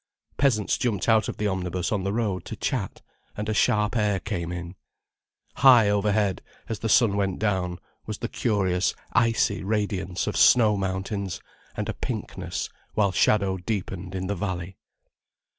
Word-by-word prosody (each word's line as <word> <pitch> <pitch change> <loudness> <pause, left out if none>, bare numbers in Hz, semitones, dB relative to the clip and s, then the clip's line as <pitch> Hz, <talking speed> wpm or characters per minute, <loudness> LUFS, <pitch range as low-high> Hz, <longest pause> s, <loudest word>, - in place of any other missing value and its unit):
Peasants 120 -7 +1
jumped 105 -7 -1
out 110 -1 +3
of - - -5
the 105 - -2
omnibus 90 -2 -2
on 105 - +1
to 95 - -5
the 100 - 0
road, 105 -6 -1
to - - -6
chat—and 105 0 -5
a 110 - 0
sharp 105 +2 +2
air 105 -3 +1
came 90 -5 -4
in. 85 0 -6 0.8
High 120 -6 +7
overhead, 105 -1 +1 0.3
as 115 - -4
the 115 - -2
sun 105 -2 +4
went 95 -2 0
down, 95 -4 -1 0.3
was - - -4
the - - -3
curious 95 -5 0 0.2
icy 115 -4 +2
radiance 100 -3 -1
of - - -3
snow 110 -4 +6
mountains, 95 0 -3 0.4
and - - -2
a - - -2
pinkness, - - -4 0.3
while 100 -2 +3
shadow 100 -1 +2
deepened 95 -1 -4
in 95 0 -3
the 100 - -1
valley. 95 -2 -4
100 Hz, 160 wpm, -25 LUFS, 95-110 Hz, 0.8 s, High